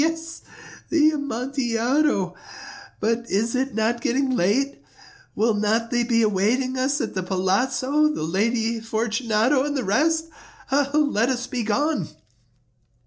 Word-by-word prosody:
he!—yes, 325 +1 -3 0.5
the 310 -2 +4
Amontillado. 255 - 0 0.7
But 230 +2 -1
is 225 +4 0
it 265 -2 -1
not 225 +2 0
getting 260 +3 0
late? 255 +6 0 0.5
Will 225 +1 +2
not 220 +2 0
they 240 -1 +2
be 230 -1 +2
awaiting 220 +6 +1
us 265 +3 0
at - - -3
the 185 - -2
palazzo, 250 +11 +1
the 305 - -2
Lady 225 +7 0
Fortunato 225 +3 0
and 290 0 -2
the 260 - -1
rest? 320 +10 +1 0.4
Let 280 -4 +2
us 245 -2 -1
be 250 -1 -3
gone." 225 - 0
240 Hz, 130 wpm, -23 LUFS, 220-280 Hz, 0.7 s, the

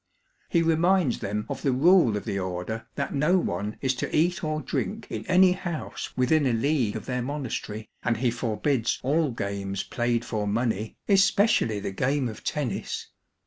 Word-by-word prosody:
He 170 -2 +3
reminds 165 -2 +3
them 105 0 -3
of - - -5
the 135 - +2
rule 140 - +5
of - - -6
the 100 - -2
Order 95 +4 -4
that 140 - -2
no 150 +6 +3
one 105 - -2
is 130 -1 +1
to - - -3
eat 175 +4 +2
or 155 -1 -1
drink 215 +7 -3
in - - -5
any 185 0 +6
house 175 -3 -4
within 135 +3 +3
a 125 - +2
league 125 -2 +1
of - - -5
their 125 -1 -2
monas 140 0 -3
tery, 110 0 -7
and 120 -2 0
he 120 0 +1
forbids 115 +1 0
all 150 +3 +2
games 100 -3 -3
played 120 -1 -1
for 105 -2 -2
money, 110 0 -1
especially 195 - +3
the 100 -1 -4
game 135 +6 0
of 110 - -8
tennis. 145 -5 -3
125 Hz, 180 wpm, -26 LUFS, 110-155 Hz, -, any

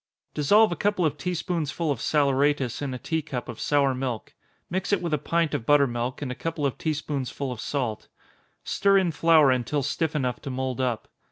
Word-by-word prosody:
_ - - -49
Dissolve 205 +8 +4
a - - -1
couple 205 -3 +1
of 150 -2 +1
tea 175 +5 -3
spoonsful 165 -2 -2
of 135 - -2
saleratus 140 -3 +1
in 140 -2 -2
a 130 - -4
tea 160 +6 -2
cup 140 -5 -5
of 120 -3 -7
sour 140 -2 +2
milk 125 -3 -4 0.3
mix 190 +3 -2
it 200 - +3
with 170 -3 -3
a 150 - +2
pint 165 +2 0
of 115 - -3
butter 145 -1 +6
milk, 120 +2 -3
and 130 - -3
a - - -2
couple 160 +2 -3
of 135 - 0
tea 155 -1 0
spoonsful 140 -2 -3
of 120 -3 -6
salt. 125 -7 -3 0.6
Stir 195 0 +3
in 185 -3 +2
flour 160 -3 +5
until 130 +3 0
stiff 160 +3 -1
enough 125 -4 -1
to - - -6
mould 130 0 -2
up. 125 -4 -1
145 Hz, 215 wpm, -26 LUFS, 130-165 Hz, 0.6 s, butter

